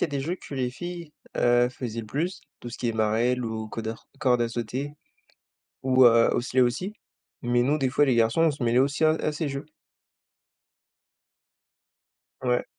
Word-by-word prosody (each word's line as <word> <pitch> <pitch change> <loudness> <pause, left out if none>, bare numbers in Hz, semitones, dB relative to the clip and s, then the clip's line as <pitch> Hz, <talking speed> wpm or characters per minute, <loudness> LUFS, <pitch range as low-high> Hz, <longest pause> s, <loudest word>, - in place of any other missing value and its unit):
y - - +3
a - - -2
des 140 -1 -3
jeux 165 +6 -2
que 165 - -12
les 130 -2 0
filles, 170 +3 -7 0.2
heu, 120 0 +4
faisaient 120 -3 -5
le 110 - -10
plus. 165 - -2 0.2
Tout 120 - -8
ce - - -7
qui 120 - -2
est 115 - 0
marelle 115 +3 +1
ou 110 -1 -4
codar 110 0 -6
corde 125 -3 +2
à 115 - 0
sauter 125 +5 -4 0.9
ou, 130 0 +5
heu, 115 0 +6
osselets 125 +1 +1
aussi. 125 - +1 0.5
Mais 120 0 +2
nous 145 +4 +1
des 135 - +1
fois 140 +3 +3
les 130 -4 +2
garçons 115 +8 +3
on 165 - +5
se 140 -4 -4
mêlait 120 +2 +3
aussi 140 +3 +1
à 155 - +6
à 155 -1 0
ces 150 0 -3
jeux. 140 +2 -5 2.8
Ouais. 125 -1 +1
125 Hz, 190 wpm, -26 LUFS, 120-145 Hz, 2.8 s, heu